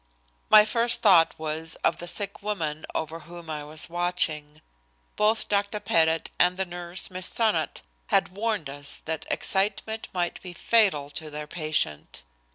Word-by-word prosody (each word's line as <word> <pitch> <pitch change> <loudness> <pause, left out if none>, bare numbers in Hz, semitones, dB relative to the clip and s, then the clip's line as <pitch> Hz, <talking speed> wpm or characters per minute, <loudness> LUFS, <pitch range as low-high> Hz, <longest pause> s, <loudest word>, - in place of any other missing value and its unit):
My 215 -1 +8
first 235 +2 +2
thought 180 -6 +5
was 160 +1 -2
of - - +1
the 175 - -7
sick 200 +2 0
woman 160 -7 -3
over 160 +1 -3
whom 170 -1 -10
I 150 -1 -4
was 150 +1 +3
watching. 165 -4 -1 0.5
Both 215 +1 +2
Dr. 205 +1 -1
Pettit 160 -3 +1
and 180 +1 +4
the 190 - -1
nurse, 175 +1 -5
Miss 185 0 0
Sonnot, 225 -2 0 0.3
had 195 -3 +2
warned 205 -3 -2
us 145 +1 -4
that 160 0 -4
excitement 215 +3 -1
might 175 -2 -2
be 180 -2 -9
fatal 180 -9 +2
to 155 +2 -6
their 150 0 -6
patient. 150 - -2
175 Hz, 155 wpm, -26 LUFS, 155-200 Hz, 0.5 s, My